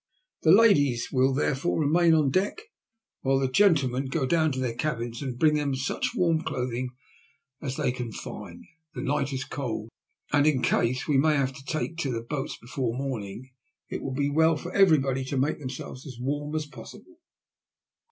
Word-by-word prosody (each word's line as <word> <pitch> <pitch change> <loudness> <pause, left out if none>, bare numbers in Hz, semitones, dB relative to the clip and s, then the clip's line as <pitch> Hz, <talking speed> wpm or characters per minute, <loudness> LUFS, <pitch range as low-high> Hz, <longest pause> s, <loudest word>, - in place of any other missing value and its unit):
The 160 - +5
ladies 155 - +4
will 130 0 +3
therefore 140 +4 0
remain 165 +2 +4
on 150 -4 +3
deck, 195 - 0 0.6
while 135 0 +2
the 135 0 +1
gentlemen 135 -5 +3
go 135 +1 -1
down 160 +2 +2
to 130 - -3
their 125 -3 -1
cabins 120 -3 -3
and 130 -3 -4
bring 155 +2 +4
them 145 -2 0
such 135 - -2
warm 165 -6 +2
clothing 125 -3 -3 0.7
as 135 -3 -3
they - - 0
can 125 -2 -5
find. - - -8 0.3
The - - -4
night 140 0 0
is 135 -1 -2
cold, 115 -6 -4 0.4
and 145 +1 +4
in 135 -5 +2
case 125 +2 +1
we 145 -3 +3
may 155 +2 +4
have 135 -2 0
to 135 +1 -12
take 160 +3 -3
to 145 -5 -1
the 115 -1 -3
boats 135 +4 -4
before 120 -1 -3
morning 130 -2 -5 0.4
it - - -4
will 130 -1 -4
be 140 +1 0
well 160 +1 +4
for 175 +4 -7
everybody 140 -9 +4
to 135 +1 -3
make 145 +5 0
themselves 130 0 -7
as 130 -3 -9
warm 145 +4 -2
as 155 -1 -1
possible." 335 - -13
135 Hz, 180 wpm, -27 LUFS, 130-155 Hz, 0.7 s, The